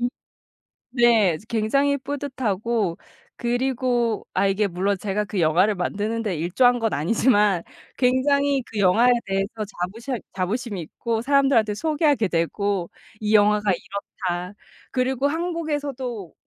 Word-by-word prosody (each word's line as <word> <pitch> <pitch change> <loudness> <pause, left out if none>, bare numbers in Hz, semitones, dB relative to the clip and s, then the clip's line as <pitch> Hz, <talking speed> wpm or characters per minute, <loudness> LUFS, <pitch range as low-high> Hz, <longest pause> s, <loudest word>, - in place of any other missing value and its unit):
음 245 - +1 0.8
네. 230 -9 +4
즈 210 - -17
굉장히 275 +6 +1
뿌듯하고 235 -8 -2 0.4
그리고 245 -2 0
아 195 +2 +2
이게 200 +1 +1
물론 195 +3 -1
제가 210 +1 -1
그 200 -2 -3
영화를 175 +6 +3
만드는 210 +5 -2
데 200 -5 -2
일조한 235 +10 +2
건 225 -1 0
아니지만 205 - +2 0.3
굉장히 275 +2 +2
그 220 - -9
영화에 220 +6 +5
대해서 195 +3 -2 0.2
자부셔 230 +8 -3 0.2
자부심이 200 +1 -2
있고 225 +8 -3
사람들한테 270 -5 +3
소개하게 295 -4 +1
되고 180 +2 -1 0.3
"이 215 0 -1
영화가 210 0 +4
이렇다." 180 -1 -5 0.4
그리고 260 +1 0
한국에서도 290 - -3
220 Hz, 295 characters per minute, -23 LUFS, 195-260 Hz, 0.8 s, 영화에